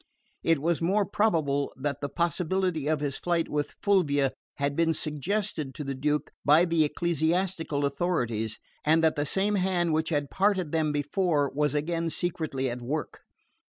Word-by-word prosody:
It 165 -1 +3
was 165 +4 0
more 195 +5 +2
probable 155 -10 +1
that 140 +1 -3
the 145 - -2
possibility 175 -1 0
of 155 -1 +1
his 140 -2 -2
flight 170 -2 0
with 150 -1 -2
Fulvia 145 -9 +3 0.2
had 140 0 -1
been 165 0 +2
suggested 155 -1 -2
to 150 - -5
the 140 -1 -3
Duke 150 +3 -1
by 155 +4 +6
the 165 -2 +3
ecclesiastical 160 0 0
authorities, 120 -8 -1 0.3
and 160 +2 +3
that 160 -1 +3
the 145 0 -1
same 195 +6 +1
hand 180 -4 +1
which 160 +1 +1
had 145 -3 -1
parted 190 -5 +1
them 155 -2 +1
before 145 0 +1
was 150 0 +1
again 165 +2 -1
secretly 155 -5 -2
at 120 0 -4
work. 145 +6 -4
155 Hz, 160 wpm, -28 LUFS, 145-175 Hz, 0.3 s, by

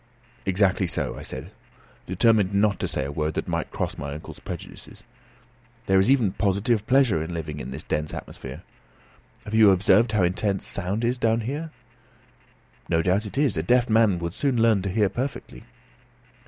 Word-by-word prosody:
"Exactly 95 0 +2
so," - - -2
I - - -8
said, 65 - -8 0.6
determined 100 +1 +3
not 100 -1 +2
to - - -1
say 65 - -2
a 70 - -4
word 75 +1 -2
that - - -3
might - - -2
cross - - -4
my 70 0 -5
uncle's 80 - -10
prejudices. - - -9 0.8
"There 95 0 +4
is 95 - +3
even 125 -8 +3
positive 105 +3 0
pleasure 130 - +3
in 85 +2 -5
living 75 -2 -5
in - - -6
this 70 +4 -6
dense 75 0 -2
atmosphere. - - -8 0.8
Have 105 - -8
you 110 -2 +7
observed 100 +4 +4
how 105 -3 +3
intense 95 +2 0
sound 100 +4 -3
is 125 +1 0
down 115 0 +2
here?" 145 +8 -4 1.2
"No 80 0 +2
doubt 95 +4 +1
it 105 - -8
is. 140 - +2
A - - +1
deaf 120 +7 +2
man 110 -4 +4
would 85 0 -4
soon 135 -1 0
learn 115 -3 +4
to 95 - -3
hear 105 +2 +2
perfectly." 130 +7 -5
100 Hz, 180 wpm, -24 LUFS, 90-115 Hz, 1.2 s, you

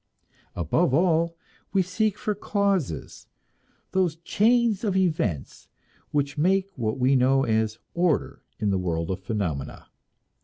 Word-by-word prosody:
Above 125 - +1
all, 165 0 +2 0.4
we 195 -2 +3
seek 205 +3 0
for 210 - -1
causes; 200 - -2 0.6
those 185 -4 +1
chains 220 +5 +2
of 200 -4 +1
events 155 - -1 0.4
which 145 0 -1
make 190 +4 +2
what 110 -4 -2
we 130 +1 +3
know 135 +1 +4
as 110 -1 0 0.2
order 170 -3 0 0.2
in 105 -2 0
the 95 - +1
world 85 -1 -2
of 95 - -3
phenomena. 95 -9 -4
155 Hz, 125 wpm, -25 LUFS, -, 0.6 s, know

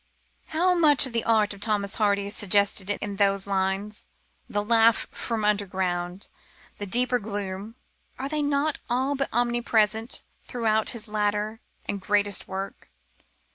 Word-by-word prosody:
How 355 +3 +2
much 300 -6 +6
of 260 - -6
the 230 - 0
art 215 -2 +3
of 200 - -14
Thomas 205 -2 0
Hardy 200 -2 +1
is 200 - 0
suggested 200 0 +1
in 205 -1 -3
those 195 -1 +2
lines! 195 +2 -2 0.4
The 205 0 -1
laugh 230 0 +4
from 225 -3 -3
underground, 185 -3 -1 0.5
the 205 - -4
deeper 245 +4 +3
gloom 205 0 -4 0.4
are 265 - -3
they 305 +1 -1
not 290 +1 0
all 260 +4 +1
but 275 -1 -2
omnipresent 235 -1 +1 0.2
throughout 220 -3 0
his 230 -2 -4
later 210 +1 -1 0.3
and 200 -1 -4
greatest 205 0 +1
work? 195 +1 -6
210 Hz, 140 wpm, -25 LUFS, 200-235 Hz, 0.5 s, much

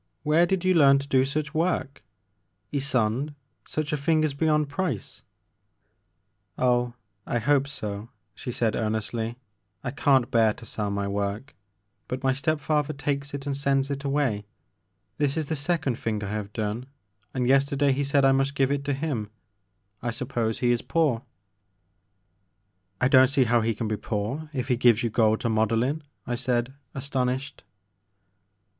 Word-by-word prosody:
Where 160 +3 +4
did 190 0 0
you 185 - +5
learn 140 -5 +6
to 140 0 -4
do 130 -2 +4
such 150 +1 -2
work? 160 -4 -1 0.7
Ysonde, 135 0 0 0.3
such 155 0 -2
a - - +1
thing 155 +2 +2
is 155 -2 +1
beyond 150 0 +2
price! 145 - -3 0.7
" - - -48
Oh, 125 -1 +2 0.3
I - - 0
hope 140 +4 +2
so," 105 -6 -5 0.2
she 125 - -6
said 115 -2 0
earnestly, 110 +1 -2 0.5
I 125 - -2
can't 135 -2 +3
bear 110 -2 +4
to 115 - -13
sell 105 -2 -3
my 100 0 -1
work, 100 +6 -3 0.5
but 125 +1 -4
my 130 0 +3
step 145 +3 0
father 150 0 0
takes 140 0 -3
it 140 -1 -6
and 140 -1 -1
sends 140 0 +1
it 140 0 -3
away. 135 -8 0 0.7
This 145 +1 +1
is 155 -3 -2
the 160 - 0
second 145 -4 -1
thing 105 -2 -2
I 100 - -4
have 105 -1 -4
done 110 +3 -3 0.4
and 125 -2 -1
yesterday 140 +1 +3
he 140 +2 0
said 140 0 +3
I 135 - +6
must 135 +1 +1
give 135 0 +2
it 140 0 0
to 140 - 0
him. 135 -8 -2 0.7
I 120 - -2
suppose 115 -2 -2
he 120 -1 +3
is 120 - +1
poor." 150 -9 +1 1.8
I 130 - +4
don't 130 0 +7
see 135 0 +3
how 120 -1 +3
he 115 0 0
can 115 - -3
be 105 0 -1
poor 115 +11 -3
if 130 -4 -3
he 125 -3 +2
gives 120 -2 +4
you 115 - 0
gold 110 -1 +3
to 115 - 0
model 110 +1 +2
in," 145 +5 -1 0.2
I 120 - -2
said, 120 0 0 0.2
astonished. 135 0 -2
135 Hz, 170 wpm, -26 LUFS, 115-145 Hz, 1.8 s, don't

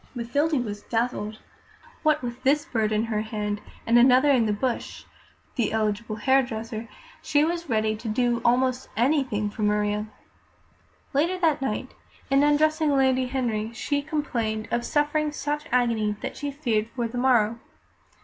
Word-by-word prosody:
Mathilde 275 +3 0
was 205 -1 -5
dazzled. 225 -2 -2 0.6
What 305 -2 +2
with 240 +1 -5
this 290 +3 +2
bird 220 -8 0
in 215 0 +1
hand, 210 -2 -2 0.2
and 235 +1 +5
another 255 +3 +6
in 240 -5 +3
the - - +1
bush 235 +4 -3 0.5
(the 235 -5 0
eligible 215 0 -1
hairdresser), 230 -2 0 0.3
she 295 0 +2
was 340 -1 -3
ready 215 -1 +1
to 225 - -8
do 240 +2 +1
almost 255 +1 +1
anything 240 -5 +1
for 215 - -7
Maria. 210 0 +1 1.1
Later 330 +7 +1
that 320 -5 +2
night, 255 0 -2 0.4
in 275 0 +5
undressing 300 0 +3
Lady 260 -1 +3
Henry, 230 -4 -2
she 285 +4 -1
complained 235 -8 -2
of 240 0 0
suffering 295 +2 +1
such 295 0 -3
agony 230 -4 +1
that - - -5
she 290 - -4
feared 235 -7 -1
for 240 -2 -1
the 245 +2 -4
morrow. 235 -3 +3
245 Hz, 150 wpm, -25 LUFS, 220-285 Hz, 1.1 s, another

